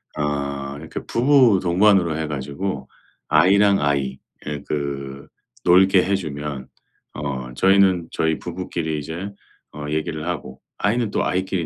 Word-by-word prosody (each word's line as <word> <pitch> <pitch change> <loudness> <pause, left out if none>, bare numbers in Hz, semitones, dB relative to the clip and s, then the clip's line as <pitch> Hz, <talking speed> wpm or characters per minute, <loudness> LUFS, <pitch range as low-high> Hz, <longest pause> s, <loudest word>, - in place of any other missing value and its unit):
어 70 -1 -3
이렇게 80 +2 -7
부부 125 -5 +4
동반으로 90 -2 +3
해 80 - -2
가지고 70 +1 -4 0.4
아이랑 100 +6 +5
아이 70 -2 0 0.3
예 75 -1 -4
그 70 -2 -4 0.4
놀게 95 +1 +6
해 100 - 0
주면 75 -6 -5 0.5
어 65 -4 -4
저희는 95 -1 +3
저희 80 -1 0
부부끼리 85 -3 -4
이제 85 +7 -6 0.4
어 75 -1 -7
얘기를 80 +1 -3
하고 70 -6 -5 0.2
아이는 115 +1 0
또 - - -1
아이끼리 95 -1 -1
80 Hz, 270 characters per minute, -22 LUFS, 70-95 Hz, 0.5 s, 놀게